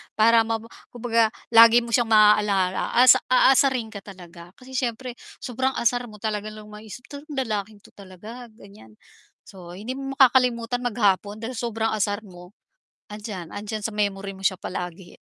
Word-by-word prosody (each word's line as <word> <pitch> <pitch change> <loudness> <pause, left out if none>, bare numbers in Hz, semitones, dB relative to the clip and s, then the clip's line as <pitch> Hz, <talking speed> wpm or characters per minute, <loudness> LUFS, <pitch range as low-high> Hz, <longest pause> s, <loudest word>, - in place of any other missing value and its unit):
para 225 +1 +4
maba 225 0 -4 0.2
kumbaga 230 -1 +1 0.2
lagi 230 +1 +7
mo 235 - -8
siyang 235 0 +2
maaalala 210 -3 +3
asa 250 +1 +7
aasarin 255 -2 +3
ka 205 - -8
talaga. 175 -3 -14
Kasi 255 +1 -16
siyempre 255 -1 -3 0.3
sobrang 260 0 -2
asar 245 +1 0
mo 215 - -13
talaga 215 -1 -3
lang 215 0 -11
maisip 215 +2 -11 0.2
lalaking 215 -7 -4
to - - -19
talaga 210 +6 -12
ganyan. 200 - -17 0.5
So 175 -2 -12
hindi 215 +7 -6
mo 270 0 -6
makakalimutan 245 -2 +3
maghapon 210 -2 0
dahil 230 - -4
sobrang 225 -1 -2
asar 210 0 -2
mo, 180 -1 -15 0.5
andiyan, 205 -5 -8
'andiyan 210 +1 -5
sa 225 - -8
memory 200 -1 -3
mo 195 - -12
siya 190 -1 0
palagi. 180 0 -6
215 Hz, 155 wpm, -23 LUFS, 200-240 Hz, 0.5 s, lagi